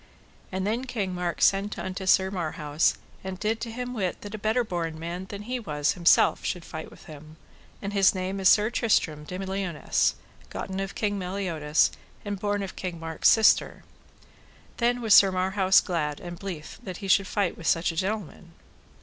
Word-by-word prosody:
And 190 0 -2
then 230 +5 -1
King 210 -7 -3
Mark 175 -1 -2
sent 200 +2 +2
unto 185 0 -5
Sir 190 0 +4
Marhaus, 155 -4 0 0.3
and 190 0 -5
did 220 +2 -1
him 245 +1 -5
to - - -6
wit 190 -7 -2
that 205 0 -8
a 215 - -5
better 220 +4 +1
born 170 -6 -3
man 170 +3 -5
than 200 +1 -8
he 250 +3 -3
was 150 -9 0
himself 175 -3 +4
should 175 -2 -3
fight 160 0 -7
with - - -16
him, 155 +1 -12 0.5
and 200 +1 -4
his 195 -1 +4
name 190 +1 -3
is 190 -2 +5
Sir 215 +2 +4
Tristram 160 -11 +1
de 180 - -6
Liones, 190 -4 0 0.3
gotten 190 0 -5
of 195 0 -4
King 205 -2 -1
Meliodas, 180 -5 +1 0.3
and 205 -1 -3
born 205 0 -1
of 190 - -7
King 180 -3 -5
Mark's 165 -1 +2
sister. 220 -2 +4 0.9
Then 245 +1 +1
was 220 -3 +4
Sir 195 -1 +8
Marhaus 190 +1 +3
glad 150 -5 -2
and 175 -1 -8
blithe 175 -6 -7
that 185 -3 -7
he 195 - -7
should 190 +1 +4
fight 200 -3 0
with 165 - -7
such 165 +1 +2
a - - -9
gentleman. 185 -2 -4
190 Hz, 185 wpm, -26 LUFS, 170-205 Hz, 0.9 s, Sir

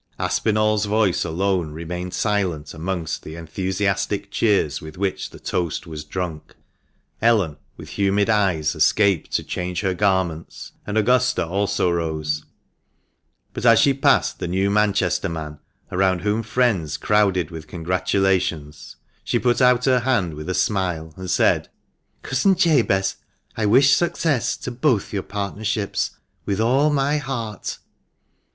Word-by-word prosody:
409 - - -3
Aspinall's 110 -1 +1
voice 105 -3 +1
alone 85 -1 -1
remained 90 +3 -5
silent 95 -8 -1
amongst 85 -1 -3
the 80 - -9
enthusiastic 95 +4 -2
cheers 100 -10 +1
with 80 +1 -10
which 95 0 -2
the - - -13
toast 85 0 -2
was 80 -3 -7
drunk. 80 0 -5 0.7
Ellen, 105 -10 +2 0.2
with - - -10
humid 100 +1 +2
eyes, 95 -9 +1
escaped 95 +3 +2
to - - +1
change 90 -1 -3
her 95 -2 0
garments, 95 -4 -1 0.2
and 105 +1 -2
Augusta 125 0 +2
also 95 0 0
rose; 80 -3 -2 1.1
but - - -6
as 115 -2 +6
she 140 - +4
passed 135 - +2
the - - -3
new 95 +3 0
Manchester 100 -3 +1
man, 75 -2 -6 0.3
around 95 -1 +1
whom 105 +2 0
friends 105 - 0
crowded 95 -5 +1
with 80 -2 -8
congratulations, 90 -3 -1 0.3
she - - 0
put 120 +1 +1
out 125 -1 +4
her 130 -2 +4
hand 115 -10 0
with 75 +3 -7
a 90 - -1
smile, 90 -6 -1
and 95 -1 -7
said, - - +2 0.5
"Cousin 185 +9 +2
Jabez, 120 - +2 0.4
I 110 -2 0
wish 130 +5 +5
success 160 -6 0
to 125 - -6
both 120 -5 0
your 100 - -1
partnerships 105 +1 -3 0.3
with 100 0 -2
all 130 +7 +3
my 145 +1 +1
heart." 120 -6 -5
95 Hz, 140 wpm, -22 LUFS, 85-110 Hz, 1.1 s, as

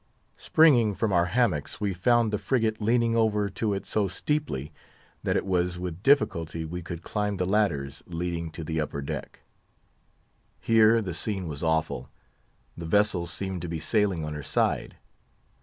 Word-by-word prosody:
Springing 120 -10 +4
from 110 -1 0
our 85 -1 +4
hammocks, 90 - 0
we 100 -2 -1
found 115 +4 +2
the 105 - 0
frigate 110 +1 0
leaning 115 +1 +2
over 105 -3 +2
to 105 +2 -2
it 100 -1 -3
so 105 -2 0
steeply, 95 - -3 0.5
that - - 0
it - - -2
was 90 -1 0
with 90 -1 -5
difficulty 85 - +2
we 90 +3 -5
could 85 0 -7
climb 105 -1 -2
the 90 - 0
ladders 90 -9 0
leading 85 -1 -3
to 80 +1 -7
the 80 0 -1
upper 70 -1 -4
deck. - - -6 1.2
Here 115 0 +4
the 90 -3 -4
scene 95 +2 -3
was 75 -2 -6
awful. 80 -6 -1 0.7
The 85 -1 -7
vessel 100 -2 +2
seemed 95 -2 -4
to 85 - -5
be 80 -1 -3
sailing 100 -5 +1
on 75 - -4
her 75 - -5
side. - - -1
95 Hz, 165 wpm, -27 LUFS, 80-110 Hz, 1.2 s, Springing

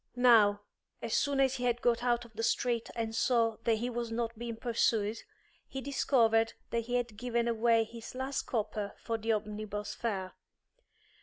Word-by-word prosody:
Now, 220 -5 +5 0.4
as - - -3
soon 280 -1 +2
as 265 -1 +3
he 250 - -2
had 240 -1 +1
got 240 -1 +1
out 240 -1 +1
of 230 - -16
the 225 - -4
street 235 0 0
and 225 -1 -2
saw 230 -2 +2
that 230 - +4
he 230 +3 -2
was 240 -1 -3
not 230 0 -2
being 235 0 -5
pursued, 225 -2 +1 0.5
he 270 - -5
discovered 230 -5 +2 0.2
that 230 -1 -1
he 245 +1 -2
had 240 -3 -1
given 235 0 0
away 230 0 +3
his 230 +2 -10
last 265 +1 -3
copper 210 -3 -2
for 225 -1 -2
the 225 +1 0
omnibus 210 -1 -3
fare. 195 -5 -3
230 Hz, 175 wpm, -31 LUFS, 220-240 Hz, 0.5 s, Now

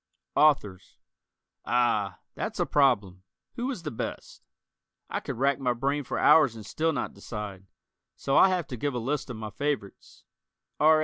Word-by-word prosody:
Authors: 105 -12 +2 0.7
Ah, 110 -6 +1
that's - - -4
a - - +2
problem. 105 -10 +2 0.3
Who 245 +2 -3
is 245 -11 -5
the 150 - -4
best? 110 - -6 0.7
I - - -1
could - - -6
rack 140 +2 +2
my 125 -2 +1
brain 140 +4 -1
for - - -4
hours 145 -8 +5
and 110 -2 -9
still 160 +9 0
not 155 - -3
decide, 100 -4 -7 0.5
so 135 - -1
I'll 190 - +7
have 180 -3 0
to 125 - -5
give 140 +2 -2
a - - 0
list 135 +5 -2
of 120 - -5
my 110 -1 -6
favorites: 140 -8 -4 0.6
R. 155 +1 +6
130 Hz, 170 wpm, -27 LUFS, 105-150 Hz, 0.7 s, I'll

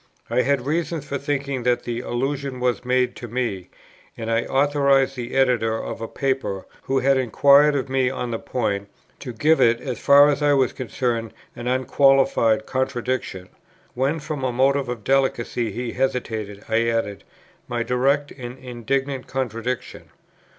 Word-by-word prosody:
I - - +3
had 140 -2 0
reasons 160 0 -2
for 140 -1 -3
thinking 140 -2 -2
that 120 0 +1
the 120 -1 -3
allusion 135 +2 -3
was 125 -3 0
made 125 0 +1
to 120 - -7
me, 115 -6 -3 0.5
and 115 0 -4
I 115 +1 +1
authorized 140 -1 +2
the 120 -1 -6
Editor 125 -4 +2
of 115 - -6
a 115 - -3
Paper, 130 -9 -2 0.2
who 135 - 0
had 135 +1 +3
inquired 140 +4 +5
of 135 -1 -1
me 130 -1 +1
on 125 -2 -4
the 115 - -2
point, 100 -5 -2 0.3
to 130 - -6
"give 150 +6 +2
it, 120 -1 +4
as 125 -5 -5
far 140 +1 +7
as 145 0 0
I 145 0 +4
was 135 -3 +2
concerned, 120 -2 -3 0.2
an 120 +1 -6
unqualified 130 -2 +3
contradiction;" 130 -7 -2 0.4
when 135 +6 0
from 150 -2 -5
a 130 - 0
motive 135 +1 +2
of 120 -3 -5
delicacy 120 -3 0
he 120 +3 -4
hesitated, 110 -6 -3
I 115 +1 +1
added 115 -3 -1 0.4
"my 120 -1 -2
direct 140 +4 +1
and 125 -1 -8
indignant 130 +2 -3
contradiction." 125 -2 -4
130 Hz, 160 wpm, -23 LUFS, 120-135 Hz, 0.5 s, far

